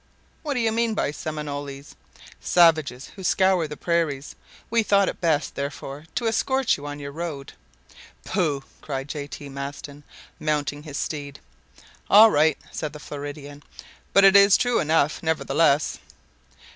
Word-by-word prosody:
"What 295 -3 -3
do - - 0
you 225 -2 +1
mean 230 0 0
by 145 - 0
Seminoles?" 145 -2 -6 0.5
"Savages 155 -7 +3
who 195 - -10
scour 185 -3 +2
the 150 0 -8
prairies. 160 -5 -1 0.4
We 230 0 +3
thought 200 -2 +3
it - - -4
best, 160 -4 +1
therefore, 140 +1 -6
to 240 -2 0
escort 265 +3 +1
you 145 0 -8
on 145 0 -6
your 140 -1 -7
road." 150 -3 -6 0.7
"Pooh!" 155 -8 -1 0.2
cried 135 -2 -5
J. 145 -1 -5
T. 145 - -9
Maston, 140 +1 -8 0.4
mounting 145 -1 -1
his 150 -2 -7
steed. 145 -2 -5 0.7
"All 215 +2 +8
right," 155 -1 +3
said 150 -1 -5
the 150 - -9
Floridan; 145 0 -8 0.5
"but 195 - +5
it 195 0 +7
is 200 0 +7
true 245 -2 +1
enough, 155 -1 +1
nevertheless." 160 -2 +1
150 Hz, 145 wpm, -24 LUFS, 145-185 Hz, 0.7 s, All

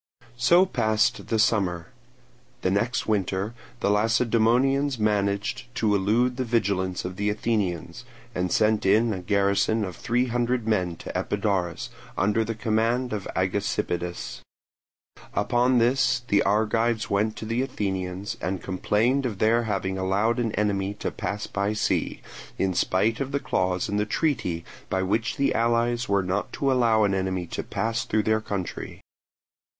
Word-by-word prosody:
So 170 +10 +5
passed 110 - +1
the 115 - 0
summer. 100 -4 +1 0.7
The 95 - +2
next 115 +6 0
winter 100 0 -1 0.3
the 100 - +2
Lacedaemonians 120 +5 +2
managed 105 +3 0
to 110 -4 +1
elude 115 +6 +2
the 130 - 0
vigilance 95 -7 0
of 90 0 -5
the 105 +1 0
Athenians, 105 -5 -2 0.3
and 90 -1 -1
sent 110 -1 +2
in 110 +4 +3
a 95 - -4
garrison 100 +3 +1
of 90 -3 -7
three 120 +7 0
hundred 120 -1 -1
men 90 -6 +1
to - - -9
Epidaurus, 100 -5 -1 0.3
under 105 +3 +2
the 115 +1 -4
command 115 +2 0
of 105 -3 -4
Agesippidas. 95 -2 -2 1.0
Upon 120 +5 +2
this 120 +1 +2
the 100 - +4
Argives 110 +2 +1
went 105 +2 +1
to - - -7
the 115 +3 0
Athenians 95 -6 -3
and 95 +2 -2
complained 115 +9 +1
of 105 -5 -5
their 115 +3 +3
having 95 -2 -2
allowed 100 +5 +1
an 115 -2 0
enemy 100 -1 0
to - - -3
pass 100 0 -4
by 100 +1 -1
sea, 105 - -1 0.4
in 95 -1 +1
spite 100 +6 +1
of 135 -1 -3
the 140 - 0
clause 90 -7 0
in 105 -1 -1
the 105 +1 0
treaty 110 - -1 0.2
by 95 0 0
which 110 +8 -1
the 140 - +2
allies 120 +1 +1
were 100 -1 +2
not 90 +1 -2
to 140 -1 +1
allow 115 -4 +3
an 100 -2 +2
enemy 95 -2 -1
to - - -4
pass 110 +3 -2
through 110 0 0
their 110 +1 +1
country. 100 -4 -5
105 Hz, 155 wpm, -25 LUFS, 95-115 Hz, 1.0 s, So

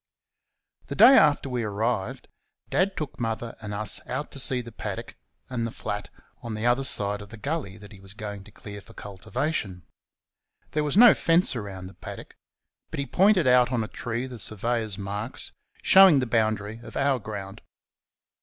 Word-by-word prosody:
The - - -5
day 270 - +8
after 145 - +4
we 125 -2 -2
arrived 105 -1 -2 0.4
Dad 190 +1 +1
took 150 -3 -5
Mother 115 0 -3
and 105 -1 -6
us 105 0 -2
out 135 +4 -4
to 140 - -4
see 130 -1 +3
the 120 -1 -8
paddock - - -6 0.3
and 120 -3 -2
the - - -6
flat 105 -1 -5 0.3
on 115 -2 -5
the 110 +2 -3
other 120 +3 +3
side 105 -6 +2
of 100 - -11
the 115 - -10
gully 120 -4 -4
that 105 0 -13
he 100 - -13
was 95 +1 -12
going 105 -2 -7
to 105 - -15
clear 100 0 -10
for 115 - -18
cultivation. 100 - -4 0.9
There 150 - 0
was 150 +5 -1
no 240 -1 +9
fence 165 -3 +3
round 100 -5 -6
the 95 - -12
paddock, - - -10 0.6
but - - -6
he 140 - -1
pointed 190 +1 +3
out 125 0 +4
on 120 -3 0
a - - -5
tree 120 +2 -4
the 125 -3 -9
surveyor's 110 0 -1
marks, 105 +4 -5 0.3
showing 190 -5 +8
the 130 - +1
boundary 110 -2 -1
of - - -9
our 135 -2 +2
ground. 100 -3 -7
115 Hz, 180 wpm, -26 LUFS, 105-135 Hz, 0.9 s, no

